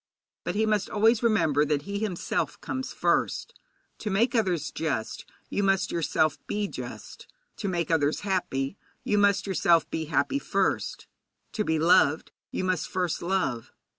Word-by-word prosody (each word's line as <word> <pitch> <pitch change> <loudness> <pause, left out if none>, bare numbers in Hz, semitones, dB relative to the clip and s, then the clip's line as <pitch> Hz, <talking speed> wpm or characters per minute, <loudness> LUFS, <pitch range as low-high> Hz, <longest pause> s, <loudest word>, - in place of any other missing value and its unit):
But - - -3
he 220 +1 +2
must 210 -2 +1
always 220 +2 +3
remember 165 - +3
that 145 -1 0
he 200 +4 -4
himself 205 -5 -2
comes 260 0 -4
first. - - 0 0.5
To 215 - -3
make 225 +5 +2
others 185 - 0
just, 140 -9 -3 0.2
you - - -1
must 195 -2 +2
yourself 155 -2 +1
be 205 0 -1
just; - - -8 0.3
to 205 - -3
make 170 -3 -1
others 150 -2 +2
happy, 180 -6 -1 0.3
you 210 - +1
must 200 -1 +3
yourself 170 -4 +3
be 160 - -2
happy 155 - +1
first; - - -1 0.5
to 215 - -1
be 160 -5 +1
loved, 160 -2 +4 0.2
you - - -3
must 185 -3 0
first 180 -3 -1
love. 170 -10 -1
185 Hz, 155 wpm, -27 LUFS, 155-205 Hz, 0.5 s, loved